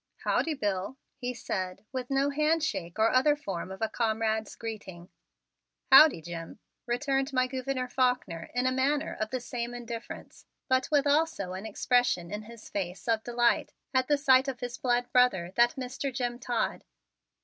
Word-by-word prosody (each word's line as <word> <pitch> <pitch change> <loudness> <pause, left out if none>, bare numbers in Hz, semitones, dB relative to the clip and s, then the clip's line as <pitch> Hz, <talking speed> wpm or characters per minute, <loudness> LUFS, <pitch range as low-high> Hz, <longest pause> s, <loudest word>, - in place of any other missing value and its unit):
"Howdy, 320 -2 +1
Bill," 205 0 -2 0.2
he 250 -2 -4
said 190 -3 -4
with 255 -2 -4
no 275 +1 +2
handshake 305 - 0
or 220 +1 +4
other 290 +4 +4
form 195 - -5
of 190 +3 -6
a - - +3
comrade's 220 -1 -1
greeting. 200 -6 -7 0.8
"Howdy, 270 - +8
Jim," 165 0 -7 0.3
returned 270 +3 0
my 255 -1 +3
Gouverneur 255 0 -3
Faulkner 250 -10 0
in 250 +1 +1
a 255 - +3
manner 280 +4 0
of 215 - -1
the 255 - -2
same 240 -1 -5
indifference 235 -1 -8 0.2
but 260 -1 +2
with 290 -2 +3
also 290 - +1
an 190 +4 -6
expression 220 -6 +1
in 210 +1 -4
his 230 +1 -12
face 185 0 -4
of 225 -1 +1
delight 240 0 +1 0.2
at 260 -1 +2
the 290 - +3
sight 265 -1 +5
of 260 -2 -3
his 245 0 -4
blood 245 -1 +1
brother, 190 -9 +3
that 240 0 +4
Mr. 265 +1 -4
Jim 245 -1 -3
Todd. 240 -3 -2
245 Hz, 165 wpm, -29 LUFS, 215-265 Hz, 0.8 s, Howdy